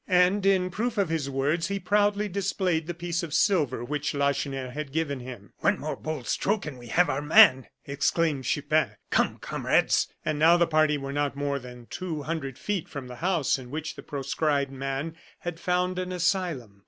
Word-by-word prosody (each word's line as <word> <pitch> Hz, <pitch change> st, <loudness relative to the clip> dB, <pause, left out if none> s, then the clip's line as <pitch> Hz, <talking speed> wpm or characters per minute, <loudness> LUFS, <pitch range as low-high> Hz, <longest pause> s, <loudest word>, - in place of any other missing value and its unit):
And 185 Hz, +2 st, +3 dB
in 185 Hz, -2 st, +3 dB
proof 230 Hz, +5 st, -2 dB
of 195 Hz, -5 st, +2 dB
his 155 Hz, -4 st, -1 dB
words, 140 Hz, +5 st, 0 dB
he 200 Hz, 0 st, -2 dB
proudly 205 Hz, +2 st, +2 dB
displayed 185 Hz, -4 st, -1 dB
the 175 Hz, -, -2 dB
piece 170 Hz, +1 st, -2 dB
of 165 Hz, -4 st, -4 dB
silver 155 Hz, -, +2 dB
which 150 Hz, +2 st, -2 dB
Lacheneur 140 Hz, -2 st, -1 dB
had 150 Hz, +1 st, -5 dB
given 145 Hz, -3 st, -1 dB
him. 120 Hz, -5 st, -10 dB
"One -, -, +2 dB
more -, -, -3 dB
bold 155 Hz, -4 st, -5 dB
stroke 205 Hz, -1 st, 0 dB
and 140 Hz, -5 st, -7 dB
we 120 Hz, -, -11 dB
have 175 Hz, +10 st, +3 dB
our 140 Hz, 0 st, -1 dB
man!" 130 Hz, -3 st, +6 dB, 0.2 s
exclaimed 140 Hz, 0 st, 0 dB
Chupin. -, -, +1 dB, 0.2 s
"Come, -, -, +2 dB
comrades!" -, -, +1 dB, 0.2 s
And 155 Hz, -1 st, -1 dB
now 165 Hz, +3 st, +6 dB
the 170 Hz, -, +4 dB
party 155 Hz, -2 st, +3 dB
were 135 Hz, 0 st, -5 dB
not 145 Hz, -1 st, -1 dB
more 140 Hz, 0 st, -1 dB
than 125 Hz, -1 st, -11 dB
two 160 Hz, +1 st, -5 dB
hundred 140 Hz, -4 st, -4 dB
feet 200 Hz, -5 st, -3 dB
from 140 Hz, -3 st, -6 dB
the 125 Hz, -, -8 dB
house 170 Hz, -7 st, +1 dB
in 125 Hz, -1 st, -10 dB
which 155 Hz, +3 st, -5 dB
the -, -, -9 dB
proscribed 140 Hz, 0 st, -1 dB
man 135 Hz, +4 st, -4 dB, 0.2 s
had 175 Hz, -1 st, -5 dB
found 180 Hz, +1 st, 0 dB
an 185 Hz, 0 st, -3 dB
asylum. 170 Hz, -, -1 dB
155 Hz, 190 wpm, -27 LUFS, 140-180 Hz, 0.2 s, man